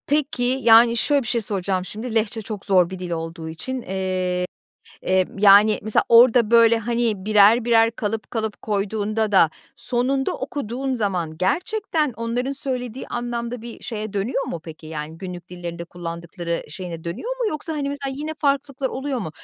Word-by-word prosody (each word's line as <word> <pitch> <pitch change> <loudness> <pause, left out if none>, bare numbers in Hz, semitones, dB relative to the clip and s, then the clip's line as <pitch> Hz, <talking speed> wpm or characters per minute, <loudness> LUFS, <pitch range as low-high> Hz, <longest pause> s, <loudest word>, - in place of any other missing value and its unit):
Peki, 285 -3 0
yani 235 -2 +5
şöyle 285 +4 +3
bir 235 - -6
şey 235 0 +1
soracağım 190 -3 -1
şimdi 220 +4 -6
Lehçe 225 0 0
çok 210 -1 -6
zor 185 -4 +4
bir 190 -1 -7
dil 180 -1 -5
olduğu 165 0 -5
için, 255 +11 -5
eee, 185 -2 -1 0.6
eee, 185 0 +2
yani 205 +1 +7
mesela 215 0 +2
orada 235 -1 +6
böyle 230 -1 +6
hani 230 -3 -1
birer 215 +2 +5
birer 230 -1 +4
kalıp 220 -2 -4
kalıp 220 -2 -3
koyduğunda 215 +1 -1
da 175 -5 +5 0.3
sonunda 260 +2 0
okuduğun 265 -1 -3
zaman 180 -8 -2
gerçekten 315 - 0
onların 230 +3 -2
söylediği 255 -3 -2
anlamda 240 0 -4
bir 235 0 -10
şeye 215 -3 -5
dönüyor 210 +7 -1
mu 170 - -5
peki? 160 -1 -10
Yani 155 0 -6
günlük 180 -1 -8
dillerinde 170 -1 -6
kullandıkları 170 0 -5
şeyine 170 0 -7
dönüyor 440 - -4
mu? 485 -3 0
Yoksa 310 +1 -4
hani 290 -2 -2
mesela 280 -1 -4
yine 310 +2 -4
farklılıklar 275 -2 0
oluyor 265 0 -3
mu? 190 -9 -4
220 Hz, 165 wpm, -22 LUFS, 185-250 Hz, 0.6 s, yani